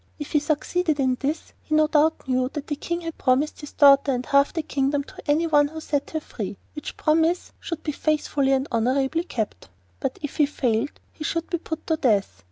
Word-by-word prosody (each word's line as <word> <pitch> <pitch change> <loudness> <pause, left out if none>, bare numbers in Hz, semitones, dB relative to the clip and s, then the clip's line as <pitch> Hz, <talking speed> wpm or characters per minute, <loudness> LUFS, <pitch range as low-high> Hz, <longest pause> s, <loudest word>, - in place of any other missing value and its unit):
If 295 - -7
he 300 - +4
succeeded 310 +1 0
in 260 -2 +2
this, 295 +3 -3
he 310 - -1
no 310 0 +5
doubt 310 -1 +2
knew 255 0 +1
that 295 -1 -4
the 295 - -2
King 340 +4 -3
had 330 -1 -6
promised 275 +5 +1
his 295 - -9
daughter 280 -1 +6
and 250 -1 -2
half 280 0 +4
the 325 - -2
kingdom 280 0 0
to - - -12
anyone 295 -1 +4
who 315 +2 -7
set 290 -2 -2
her - - +2
free, 205 -9 -6 0.2
which 300 - -7
promise 325 +3 +2
should 335 -2 -5
be 300 - -1
faithfully 290 -2 +1
and 265 +1 +1
honourably 265 +8 +1
kept, 220 - -4 0.3
but - - -2
if 295 - -5
he 295 - +4
failed 245 -3 -1
he 310 - -8
should 330 +2 -2
be 345 - 0
put 320 -1 -6
to 320 - +1
death. 205 - +1
295 Hz, 210 wpm, -24 LUFS, 270-315 Hz, 0.3 s, daughter